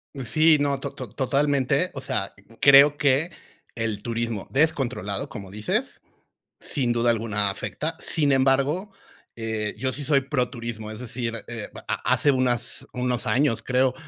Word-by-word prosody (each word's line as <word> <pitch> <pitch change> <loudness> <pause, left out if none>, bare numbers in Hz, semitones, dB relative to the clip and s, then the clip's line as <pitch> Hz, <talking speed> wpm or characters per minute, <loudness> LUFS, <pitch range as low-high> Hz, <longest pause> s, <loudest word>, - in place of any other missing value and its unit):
Y, 135 - -5
sí, 155 +6 +4
no, 140 -1 0
to 140 0 -5
to 130 -4 -7
totalmente. 140 +4 +1
O 135 - -6
sea, 95 -6 -3 0.3
creo 140 +1 +8
que 145 +4 +2 0.5
el 110 -3 -2
turismo 115 -3 -3
descontrolado, 130 - 0
como 100 -5 -8
dices, 105 +1 -2 0.6
sin 125 -4 0
duda 120 0 +2
alguna 105 -3 0
afecta. 155 +10 -4
Sin 145 -4 +1
embargo, 140 +9 +2 0.4
eh, 110 -2 -3
yo 130 +2 -1
sí 145 +2 -5
soy 140 -1 +4
proturismo, 120 -5 -3
es 110 - -7
decir, 115 -2 -4
eh, 115 -3 -5 0.2
a - - 0
a - - -1
hace 145 - +3
unas 130 -3 0
unos 125 -1 -1
años 135 -3 +2
creo, 130 0 +2
130 Hz, 155 wpm, -24 LUFS, 115-140 Hz, 0.6 s, creo